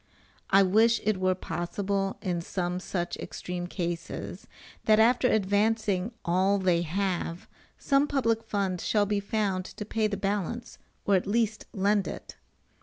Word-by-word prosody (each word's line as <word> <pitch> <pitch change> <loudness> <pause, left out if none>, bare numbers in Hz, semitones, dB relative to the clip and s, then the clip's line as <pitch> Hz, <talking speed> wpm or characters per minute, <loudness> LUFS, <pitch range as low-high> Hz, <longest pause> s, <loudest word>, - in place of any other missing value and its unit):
I 195 +1 +6
wish 220 +5 +4
it 215 -2 +1
were 185 0 +2
possible 195 +3 -2
in 175 -3 -1
some 180 +1 -2
such 175 -2 -3
extreme 175 -1 -5
cases, 175 -2 -5 0.4
that 215 0 +5
after 245 +3 +5
advancing 205 -1 +1
all 185 +3 +3
they 180 -3 +2
have, 175 0 -2 0.3
some 275 +1 +2
public 230 -6 +1
fund 200 -5 -1
should 205 -2 +1
be 205 -1 +1
found 200 -2 -1
to 210 - -7
pay 215 +1 0
the 205 -1 -3
balance 205 +4 -3 0.3
or 200 - +3
at 190 0 +2
least 220 0 0
lend 200 +1 +1
it. - - -7
200 Hz, 145 wpm, -28 LUFS, 185-215 Hz, 0.4 s, I